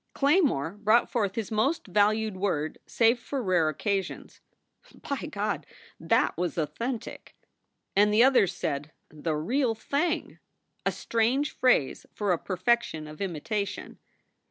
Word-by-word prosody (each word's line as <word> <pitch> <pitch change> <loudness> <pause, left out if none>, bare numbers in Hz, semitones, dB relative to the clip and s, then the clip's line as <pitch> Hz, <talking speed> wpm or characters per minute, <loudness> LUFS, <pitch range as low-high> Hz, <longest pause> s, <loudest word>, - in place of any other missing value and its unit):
Claymore 275 - +2
brought 215 +3 +3
forth 205 -6 0
his 225 -2 -3
most 265 +10 +1
valued 210 +2 +2
word 180 -6 -2
saved 230 +1 +3
for 275 +4 -4
rare 175 -5 +2
occasions. 195 +5 -3 0.7
"By - - -3
God! - - -3 0.3
that - - +2
was 175 -2 -2
authentic!" 230 - -4 0.6
And 205 +1 +5
the 215 +3 +6
others 255 -8 +5
said, 145 +2 -4 0.2
"The 155 +1 -3
real 230 - 0
thing!" 310 +9 -2 0.5
a - - +3
strange 245 +6 0
phrase 250 - +1
for 205 -3 0
a 175 - +1
perfection 185 -4 0
of 150 +2 -10
imitation. 200 +3 -3
210 Hz, 130 wpm, -27 LUFS, 175-235 Hz, 0.7 s, the